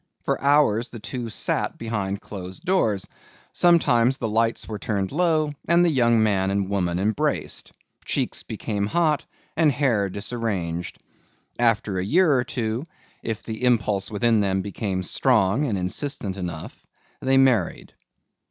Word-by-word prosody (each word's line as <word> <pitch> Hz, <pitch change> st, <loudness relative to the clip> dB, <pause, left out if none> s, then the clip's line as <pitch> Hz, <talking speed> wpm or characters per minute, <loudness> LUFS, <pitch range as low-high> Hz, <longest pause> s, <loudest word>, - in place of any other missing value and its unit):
For -, -, -1 dB
hours 140 Hz, -5 st, +3 dB
the 120 Hz, -, -9 dB
two 120 Hz, +1 st, -5 dB
sat -, -, -1 dB
behind 105 Hz, -3 st, -3 dB
closed 95 Hz, -2 st, -8 dB
doors. 110 Hz, -, +1 dB, 0.5 s
Sometimes 135 Hz, -8 st, +4 dB
the 115 Hz, -, -2 dB
lights 115 Hz, +1 st, 0 dB
were 105 Hz, -2 st, -5 dB
turned 100 Hz, -3 st, -2 dB
low 155 Hz, -2 st, +1 dB
and 170 Hz, +1 st, +4 dB
the 170 Hz, -, +3 dB
young 120 Hz, -5 st, +3 dB
man 95 Hz, -3 st, +1 dB
and 100 Hz, 0 st, -1 dB
woman 90 Hz, -3 st, 0 dB
embraced. 100 Hz, +3 st, -1 dB, 0.3 s
Cheeks -, -, -1 dB
became 100 Hz, -2 st, -3 dB
hot 155 Hz, +2 st, +1 dB, 0.3 s
and 160 Hz, -2 st, +4 dB
hair 120 Hz, -7 st, +1 dB
disarranged. 100 Hz, -5 st, -3 dB, 0.6 s
After 110 Hz, -5 st, +1 dB
a -, -, -1 dB
year 160 Hz, -, +3 dB
or 125 Hz, -2 st, +2 dB
two, 120 Hz, -4 st, -3 dB, 0.4 s
if 110 Hz, -2 st, -4 dB
the 110 Hz, +1 st, -6 dB
impulse 105 Hz, -5 st, +1 dB
within 115 Hz, +1 st, +2 dB
them 95 Hz, -2 st, 0 dB
became 100 Hz, -2 st, -3 dB
strong 115 Hz, +4 st, +2 dB
and 110 Hz, -8 st, -1 dB
insistent 95 Hz, +2 st, -2 dB
enough, 85 Hz, -5 st, -5 dB, 0.5 s
they 135 Hz, 0 st, +3 dB
married. 125 Hz, -9 st, +2 dB
110 Hz, 145 wpm, -24 LUFS, 100-130 Hz, 0.6 s, Sometimes